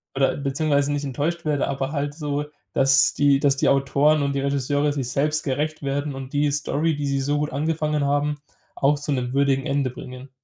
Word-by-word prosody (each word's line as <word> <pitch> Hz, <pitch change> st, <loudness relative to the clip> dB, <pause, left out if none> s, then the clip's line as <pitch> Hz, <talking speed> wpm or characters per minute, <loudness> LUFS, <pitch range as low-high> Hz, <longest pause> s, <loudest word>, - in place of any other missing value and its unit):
oder 135 Hz, 0 st, +2 dB
beziehungsweise 140 Hz, +1 st, 0 dB
nicht 145 Hz, 0 st, -2 dB
enttäuscht 155 Hz, +6 st, -2 dB
werde, 150 Hz, -2 st, 0 dB
aber 135 Hz, 0 st, -2 dB
halt 145 Hz, -1 st, -3 dB
so, 145 Hz, -2 st, -2 dB, 0.3 s
dass 135 Hz, +1 st, +4 dB
die 140 Hz, -1 st, +3 dB
dass 140 Hz, -1 st, +2 dB
die -, -, +2 dB
Autoren 140 Hz, +2 st, +3 dB
und 140 Hz, 0 st, 0 dB
die 140 Hz, -, -1 dB
Regisseure 140 Hz, +1 st, 0 dB
sich 135 Hz, -4 st, -3 dB
selbst 150 Hz, +4 st, 0 dB
gerecht 150 Hz, +3 st, -2 dB
werden 140 Hz, +1 st, -2 dB
und 135 Hz, 0 st, -8 dB
die 145 Hz, 0 st, +2 dB
Story, 150 Hz, +2 st, 0 dB
die 145 Hz, 0 st, -3 dB
sie 140 Hz, -1 st, 0 dB
so 145 Hz, +2 st, 0 dB
gut 150 Hz, 0 st, -2 dB
angefangen 150 Hz, 0 st, 0 dB
haben, 145 Hz, +1 st, 0 dB, 0.4 s
auch 145 Hz, +2 st, +2 dB
zu 145 Hz, +1 st, -4 dB
'nem 125 Hz, -2 st, -2 dB
würdigen 135 Hz, -1 st, +2 dB
Ende 140 Hz, -2 st, 0 dB
bringen. 130 Hz, +2 st, -10 dB
140 Hz, 200 wpm, -23 LUFS, 135-150 Hz, 0.4 s, dass